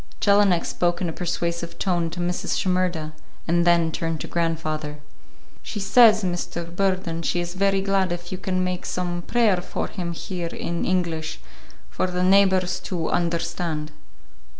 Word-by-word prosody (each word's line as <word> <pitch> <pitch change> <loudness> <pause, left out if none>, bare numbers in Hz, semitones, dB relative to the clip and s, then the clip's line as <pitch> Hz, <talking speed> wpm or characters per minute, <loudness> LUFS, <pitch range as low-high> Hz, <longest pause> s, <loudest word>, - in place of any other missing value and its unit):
Jelinek 200 -4 +4
spoke 175 -1 0
in 180 - -1
a - - -4
persuasive 170 -1 -3
tone 175 -3 0
to 175 - -7
Mrs. 175 +1 -1
Shimerda, 180 -4 0 0.3
and 170 +1 +2
then 170 -1 +4
turned 165 0 -2
to - - -5
grandfather. 155 -3 -2 0.6
"She 210 - -5
says, 215 +1 +6
Mr. 170 -1 -3
Burden, 185 -3 0
she 175 - 0
is 175 0 -3
very 195 +1 +2
glad 195 -2 +1
if 175 0 -5
you 185 - -4
can 185 -1 -1
make 180 -1 -3
some 175 -1 -2
prayer 220 -1 +2
for 175 - -3
him 175 -3 -4
here 175 0 -4
in 170 0 -3
English, 170 - -1 0.5
for - - 0
the 180 0 -1
neighbors 190 -1 +4
to 170 -4 -3
understand." 170 -2 -1
175 Hz, 155 wpm, -24 LUFS, 170-185 Hz, 0.6 s, says